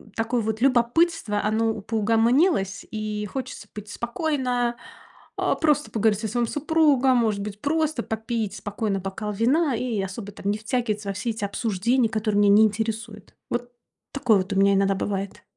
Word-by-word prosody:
такое 230 +1 0
вот 220 +1 -3
любопытство- 255 -2 +2
оно 220 0 0
поугомонилось. 225 - +2
И 215 -1 -3
хочется 255 -6 -6
быть 210 -1 -8
спокойно, 245 0 -1 0.6
а, - - +1
просто 300 -1 +1
поговорить 215 -2 +2
со 220 - -3
своим 240 +3 0
супругом, 285 -3 +3
может 215 -4 +1
быть 205 0 -6
просто 310 -3 0
попить 220 -1 -3
спокойно 205 -1 -2
бокал 195 +3 -4
вина 265 +8 +2
и 230 -3 -2
особо 195 +2 -6
там 200 0 -3
не 210 - -1
втягиваться 215 -3 -2
во - - -1
все 220 +5 -3
эти 220 -1 -6
обсуждения, 225 +3 0
которые 215 -1 0
меня 205 - +5
не 220 - +7
интересуют. 220 -1 -4
Вот 245 0 -3 0.4
такое 245 -7 +3
вот 190 +2 -2
у 195 - -1
меня 200 0 +5
иногда 195 0 +2
бывает. 195 0 -4
225 Hz, 160 wpm, -24 LUFS, 205-245 Hz, 0.6 s, не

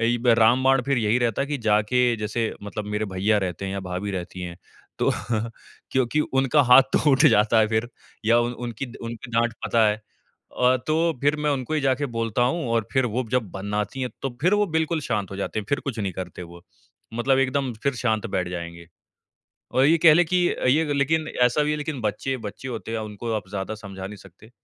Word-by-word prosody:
एइब 120 +1 0
रामबाण 130 +3 +4
फिर 135 +1 0
यही 115 +1 +2
रहता 120 +1 0
है - - -3
कि 145 -1 -2
जाके 105 +4 +3
जैसे 110 +1 -2
मतलब 105 +1 -5
मेरे 105 +1 0
भैया 105 +3 +2
रहते 90 +1 -4
हैं 95 - -3
या 100 - -3
भाभी 90 +3 -3
रहती 90 -1 -5
हैं 85 -1 -6 0.4
तो - - +2 0.8
क्योंकि 130 +3 +1 0.2
उनका 135 +2 +3
हाथ 135 - +10
तो 150 - +3
उठ 135 -1 +4
जाता 105 +2 +4
है 110 - +5
फिर 110 +1 0 0.4
या 115 +2 +4
उ 120 0 0
उनकी 120 +1 -5 0.2
उनकी 115 +1 -8
डाँट 115 +1 +2
पता 115 -2 +3
है। 105 - 0
अ, 125 +3 -2
तो 165 +2 +2
फिर 145 +2 +2
मैं 150 - +3
उनको 135 +1 -2
ही 155 - +1
जाके 135 +1 +1
बोलता 115 +1 0
हूँ 170 -4 -3
और 115 -2 +1
फिर 130 -2 +2
वो 130 +1 0
जब 120 -6 0
बनाती 105 +6 -3
हैं 125 -1 -2
तो 135 - -1
फिर 180 +6 +3
वो 210 0 +2
बिल्कुल 160 0 0
शांत 105 -8 -2
हो 95 - -6
जाते 100 +2 -3
हैं 105 - -4
फिर 140 - 0
कुछ 130 -4 -3
नहीं 100 -3 -2
करते 90 0 -7
वो। 85 0 -12 0.5
मतलब 130 +3 +2
एकदम 135 -1 0
फिर 140 -1 +1
शांत 115 -2 -1
बैठ 90 -4 -2
जाएँगे। 85 -1 -7 0.9
और 130 - +5
ये 160 +3 +5
कह 160 -1 +7
ले 175 +3 +5
कि 180 +1 +2
अ, - - -3 0.3
लेकिन 155 +3 +1 0.2
ऐसा 125 +5 +3
भी 150 - 0
है 150 - -1
लेकिन 150 -2 -4
बच्चे, 110 +5 -2
बच्चे 110 +3 -8
होते 115 -2 -5
हैं 115 - -1
उनको 110 +2 -5
आप 105 -3 -5
ज़्यादा 100 +2 -4
समझा 100 -3 -8
नहीं 105 +1 -10
सकते। 100 +4 -17
115 Hz, 215 wpm, -24 LUFS, 105-135 Hz, 0.9 s, हाथ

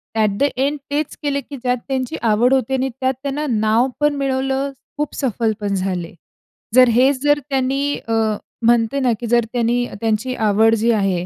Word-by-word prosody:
At 215 -2 +3
the - - +2
end 280 +3 0
तेच 295 0 -2
केले, 280 -1 0
की 280 -1 -9
ज्यात 250 0 0
त्यांची 265 +2 -2
आवड 235 +3 +3
होती. 265 0 +1
आणि 265 0 0
त्यात 260 +1 -1
त्यांना 285 +2 -2
नाव 220 +2 +2
पण 295 0 +2
मिळवलं. 270 0 -1 0.3
खूप 300 0 -3
सफल 235 -4 0
पण 205 -1 -2
झाले. 185 -3 -3 0.6
जर 255 -1 +8
हेच 260 +3 +3
जर 290 0 +3
त्यांनी 275 +2 0
अ, 225 - -1 0.5
म्हणते 235 +3 +3
ना, 250 -3 +2
की 240 - -4
जर 235 -1 +3
त्यांनी 245 0 +1 0.2
त्यांची 225 +3 -1
आवड 220 +1 +3
जी 230 +2 +2
आहे 195 -5 0
250 Hz, 180 wpm, -19 LUFS, 225-270 Hz, 0.6 s, जर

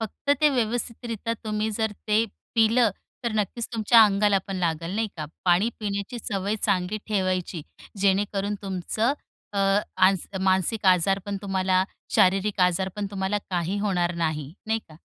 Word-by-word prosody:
फक्त 225 +6 -4
ते 300 - +6
व्यवस्थितरित्या 230 -2 -2
तुम्ही 215 0 -1
जर 220 0 -1 0.2
ते 215 +2 +4 0.3
पिलं, 225 +1 +4 0.3
तर 235 - 0
नक्कीच 215 +3 -1
तुमच्या 225 +1 +6
अंगाला 200 0 +3
पण 195 -1 -4
लागेल, 170 +1 -1
नाही 220 0 0
का. 155 - -4 0.2
पाणी 180 +5 +4
पिण्याची 200 +3 -3
सवय 200 0 -2
चांगली 195 +1 +1
ठेवायची, 185 -5 -1 0.4
जेणेकरून 200 +1 +1
तुमचं 195 +6 -1 0.4
अ, 200 - -2 0.8
मानसिक 190 +3 +1
आजार 185 +2 +4
पण 200 -1 -2
तुम्हाला, 190 -1 +1 0.3
शारीरिक 195 +1 +3
आजार 180 +1 +2
पण 205 -1 -2
तुम्हाला 195 +1 -1
काही 180 +2 -1
होणार 180 -4 0
नाही, 155 -4 -2
नाही 220 +1 +1
का? 155 - -14
200 Hz, 145 wpm, -25 LUFS, 185-220 Hz, 0.8 s, ते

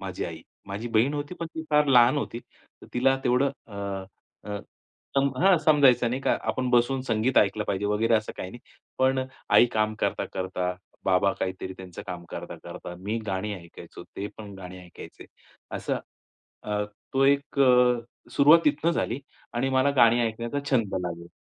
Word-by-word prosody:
माझी - - -4
आई, - - -7 0.2
माझी 100 +4 -5
बहीण 120 +6 +2
होती 145 +4 -4
पण 170 - -5
ती 160 - -4
फार 150 0 +4
लहान 125 0 +6
होती. 120 -4 -4 0.5
तिला 135 +2 +3
तेवढं 125 +3 +3 0.2
अ, 105 - -13 0.8
अ, 105 - -3 0.6
सम 140 0 +4
हां, 190 0 +5
समजायचं 140 -6 +4
नाही 130 +3 -2
का - - +2
आपण 130 0 -2
बसून 125 +2 +3
संगीत 115 +3 +2
ऐकलं 105 +1 +2
पाहिजे 100 0 -1
वगैरे 110 +3 +2
असं 110 -1 0
काही 90 - -5
नाही. 120 - -11 0.4
पण 130 0 +2 0.3
आई - - +7
काम 110 0 +1
करता-करता, 90 -1 -2 0.3
बाबा 95 +1 +3
काहीतरी 95 0 -3
त्यांचं 90 -2 -9
काम 90 -2 -6
करता-करता 90 - -8
मी 105 +5 -3
गाणी 100 +2 -2
ऐकायचो. 85 -3 -11
ते 100 - -3
पण 105 -2 -9
गाणी 90 0 -9
ऐकायचे 85 - -12 0.5
असं, - - -2 0.6
अ, 105 0 -1 0.3
तो 135 0 +3
एक 140 +1 +1
अ, 125 -2 +3
सुरुवात 145 +6 +6
तिथून 150 +3 +2
झाली 130 -5 -1 0.3
आणि 125 +3 0
मला 130 +2 +3
गाणी 120 0 +6
ऐकण्याचा 115 +4 -3
छंद 115 -7 +1
लागला. 85 0 -6
120 Hz, 165 wpm, -26 LUFS, 100-135 Hz, 0.8 s, आई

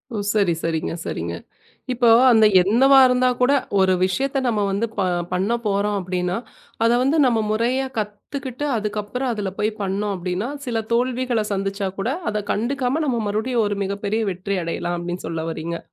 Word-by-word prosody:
ஓ! - - -2 0.2
சரி, 200 -5 +2
சரிங்க, 165 -1 -2
சரிங்க. 85 +1 -4 0.6
இப்போ 245 -1 +2 0.2
அந்த 220 -2 +6 0.2
என்னவா 260 +8 +5
இருந்தா 250 0 +3
கூட 250 +2 +3 0.3
ஒரு 190 0 +4
விஷயத்த 270 +9 0
நம்ம 225 -3 +1
வந்து 200 +4 0
ப 200 - +1 0.3
பண்ணப்போறோ 205 +2 0
அப்டின்னா 180 0 -2 0.5
அத 230 - +4
வந்து 280 +5 +2
நம்ம 235 -3 +2
முறையா 240 +5 +1
கத்துக்கிட்டு 255 +6 -5
அதுக்கப்புறம் 210 +4 -3
அதுல 205 -4 -3
போய் 215 - +2
பண்ணோ. 200 +1 -1
அப்டின்னா 180 +5 -3 0.2
சில 230 -2 -1
தோல்விகள 245 -1 0
சந்திச்சா 195 0 -2
கூட 230 +6 -1 0.2
அதக் 210 -1 -4
கண்டுக்காம 260 +6 -1
நாம 240 -4 0
மறுபடியும் 220 +3 0
ஒரு 205 - -2
மிகப்பெரிய 200 +3 -2
வெற்றி 185 +2 -3
அடையலாம் 175 +1 -3
அப்டின்னு 175 0 -5
சொல்ல 165 0 -3
வர்றீங்க? 165 +1 -4
210 Hz, 155 wpm, -22 LUFS, 190-245 Hz, 0.6 s, அந்த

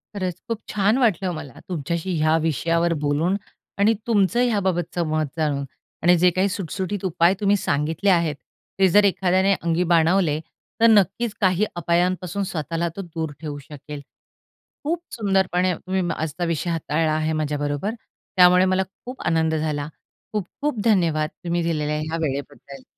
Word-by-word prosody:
खरंच 185 -3 -3
खूप 230 -1 -2
छान 210 +4 +2
वाटलं 195 -7 +2
मला 140 -5 -9
तुमच्याशी 170 +2 -2
ह्या 155 +1 +3
विषयावर 165 +2 +1
बोलून 150 +6 +1 0.4
आणि 205 +3 +4
तुमचं 225 +1 +3
याबाबतचं 185 -7 0
मत 155 0 0
जाणून 145 -3 0 0.4
आणि 175 +1 +6
जे 180 +2 +5
काही 195 +2 +2
सुटसुटीत 190 +1 -4
उपाय 175 0 +3
तुम्ही 205 -1 +3
सांगितले 160 +4 0
आहेत, 170 -5 +3 0.4
ते 190 - +6
जर 205 +4 +5
एखाद्याने 190 0 +3
अंगी 170 +1 +1
बाणवले 165 -2 +3 0.4
तर 230 - +7
नक्कीच 210 +2 +3
काही 190 +1 +3
अपायांपासून 180 +2 0
स्वतःला 165 -1 -2
तो 200 - -4
दूर 165 -4 -5
ठेवू 150 -2 -5
शकेल. 145 +1 -9 0.8
खूप 330 +3 -1
सुंदरपणे 190 -4 +1
मी 190 0 0
आजचा 160 +2 -3
विषय 165 +1 -1
हाताळला 160 -1 0
आहे 155 +1 0
माझ्याबरोबर, 145 +6 -2 0.4
त्यामुळे 180 0 +7
मला 185 0 +2 0.2
खूप 250 +1 -8
आनंद 160 -1 +2
झाला. 150 -2 -2 0.5
खूप-खूप 230 +6 -3
धन्यवाद, 165 -8 +2 0.2
तुम्ही 170 0 0
दिलेल्या 150 -2 -1
ह्या 160 +1 -3
वेळेबद्दल. 140 -2 -5
175 Hz, 145 wpm, -23 LUFS, 155-195 Hz, 0.8 s, तर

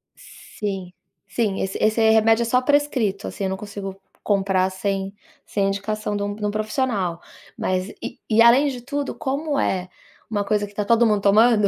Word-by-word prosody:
Sim, 195 -4 -7 0.4
sim, 210 -5 -1
esse 190 - -2
esse 220 +1 +3
remédio 225 +1 +4
é - - -2
só 250 +2 +2
prescrito, 255 -8 +1
assim, 200 - -4
eu - - 0
não 190 - -3
consigo 200 -1 -7 0.3
comprar 195 -2 +2
sem 195 +1 -3 0.3
sem 200 -1 0
indicação 210 +1 -2
de 205 - -2
um 205 0 -3
de 210 0 -4
um 205 - 0
profissional, 215 -5 -1 0.4
mas 185 +1 -1
e - - -6
e 225 0 +5
além 245 +5 +6
de 255 -3 -4
tudo, 285 +3 -3
como 285 +2 -2
é 185 -6 -1 0.4
uma 205 -2 -1
coisa 210 0 +1
que 205 - -13
está 205 0 -3
todo 230 +2 +4
mundo 210 -2 +2
tomando, 210 +1 +5
210 Hz, 185 wpm, -22 LUFS, 195-230 Hz, 0.4 s, além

